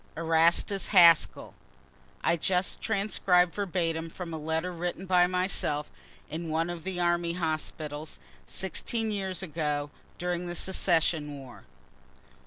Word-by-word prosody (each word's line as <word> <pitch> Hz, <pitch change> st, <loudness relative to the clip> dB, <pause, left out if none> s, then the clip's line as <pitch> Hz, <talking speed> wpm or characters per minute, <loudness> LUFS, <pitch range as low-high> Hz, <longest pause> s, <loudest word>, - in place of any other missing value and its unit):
ERASTUS 165 Hz, +3 st, +2 dB
HASKELL. 170 Hz, -4 st, +5 dB, 0.7 s
[I -, -, +3 dB
just 180 Hz, +2 st, 0 dB
transcribe 190 Hz, -4 st, +2 dB
verbatim 165 Hz, -4 st, -2 dB
from 170 Hz, 0 st, -7 dB
a -, -, -3 dB
letter 160 Hz, +3 st, -2 dB
written 175 Hz, +2 st, -4 dB
by 180 Hz, -1 st, +4 dB
myself 180 Hz, -5 st, -1 dB, 0.4 s
in 165 Hz, +1 st, -5 dB
one 165 Hz, +2 st, 0 dB
of 170 Hz, -2 st, -7 dB
the 185 Hz, -1 st, -3 dB
army 175 Hz, -1 st, +1 dB
hospitals, 155 Hz, -2 st, -4 dB, 0.3 s
16 220 Hz, +4 st, -1 dB
years 190 Hz, -2 st, -3 dB
ago, 150 Hz, -4 st, -2 dB, 0.3 s
during 180 Hz, 0 st, -2 dB
the 175 Hz, -, -5 dB
secession 165 Hz, -5 st, +1 dB
war. 130 Hz, -3 st, -12 dB
170 Hz, 120 wpm, -28 LUFS, 160-180 Hz, 0.7 s, HASKELL